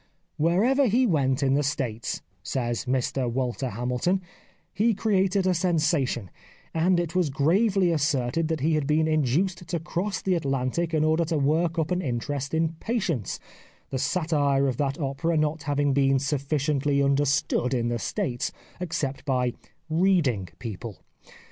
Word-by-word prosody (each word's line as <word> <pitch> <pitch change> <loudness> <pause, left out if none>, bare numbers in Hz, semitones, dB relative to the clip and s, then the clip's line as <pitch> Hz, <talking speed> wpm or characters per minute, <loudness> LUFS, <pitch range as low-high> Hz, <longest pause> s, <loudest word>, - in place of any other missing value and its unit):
" - - -46
Wherever 225 - +3
he 245 +4 +3
went 140 - +1
in 135 -1 +3
the 145 - +3
States," 130 -6 -2 0.2
says 120 +3 -2
Mr 130 -1 0
Walter 130 +1 -2
Hamilton, 125 - 0 0.3
" - - -35
he 220 +3 +2
created 195 -2 +1
a 185 - +3
sensation, 155 - 0 0.4
and 175 +2 +3
it 170 -2 -2
was 180 -4 +2
gravely 185 +6 +2
asserted 150 0 0
that 160 -3 -2
he 160 +3 +2
had 150 -3 0
been 155 +1 +2
induced 160 +5 0
to 170 0 -2
cross 175 +4 -2
the 190 - 0
Atlantic 145 +2 -1
in 155 - +2
order 160 +2 +3
to 160 0 -1
work 160 +4 +1
up 160 +1 0
an 180 0 +1
interest 140 +1 -3
in 160 0 +2
'' - - -27
Patience," 170 - -1 0.5
the 130 - -1
satire 145 -5 +1
of 130 -3 -1
that 140 0 -1
opera 155 +4 -1
not 155 +1 0
having 145 -1 +2
been 135 0 +3
sufficiently 140 +1 0
understood 140 -2 +1
in 120 -2 0
the 120 0 -1
States 120 +4 -2 0.3
except 145 -6 -3
by 125 -3 0 0.3
reading 160 - +2
people. 110 -4 -7
150 Hz, 160 wpm, -26 LUFS, 135-170 Hz, 0.5 s, Wherever